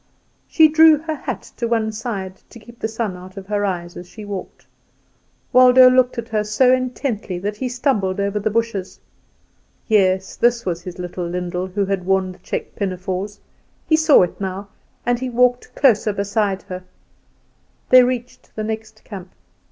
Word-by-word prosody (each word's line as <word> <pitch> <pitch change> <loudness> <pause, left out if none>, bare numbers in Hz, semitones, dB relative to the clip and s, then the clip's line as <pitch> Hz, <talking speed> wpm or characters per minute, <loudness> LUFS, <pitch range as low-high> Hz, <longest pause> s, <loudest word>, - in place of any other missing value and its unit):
She 320 -2 +6
drew 315 0 +6
her 315 +1 -4
hat 260 -7 -5
to 235 - -1
one 225 -2 0
side 205 -4 -5
to - - -13
keep 235 +1 -15
the - - -1
sun 220 -3 -3
out 185 +2 -12
of 195 - -7
her 205 +1 -1
eyes 175 -3 -3
as 175 0 -10
she 215 -2 -10
walked. 200 -2 -7 0.9
Waldo 255 0 +8
looked 255 0 +3
at 235 0 -5
her 215 -1 0
so 250 +5 +3
intently 250 -6 -2
that 205 +3 -4
he 255 +1 -3
stumbled 220 -7 0
over 200 +1 -1
the 210 +1 -1
bushes. 220 -4 -2 0.9
Yes, 190 -3 +2
this 240 0 +1
was 175 -2 -2
his 180 0 -8
little 180 0 -5
Lyndall 180 +1 -3
who 195 +2 -1
had 195 -1 -2
worn 190 -1 +1
the 180 - -15
check - - -5
pinafores; 190 +1 -4 0.5
he 315 - +4
saw 315 - +5
it 180 - -4
now, 195 +1 -4 0.4
and 245 0 +1
he 260 0 -3
walked 245 +1 +1
closer 225 -6 +3
beside 200 -1 -1
her. 185 0 -7 1.1
They 255 - +9
reached 250 0 -3
the 215 - -3
next 220 0 -6
camp. 190 -4 -9
210 Hz, 175 wpm, -20 LUFS, 190-245 Hz, 1.1 s, They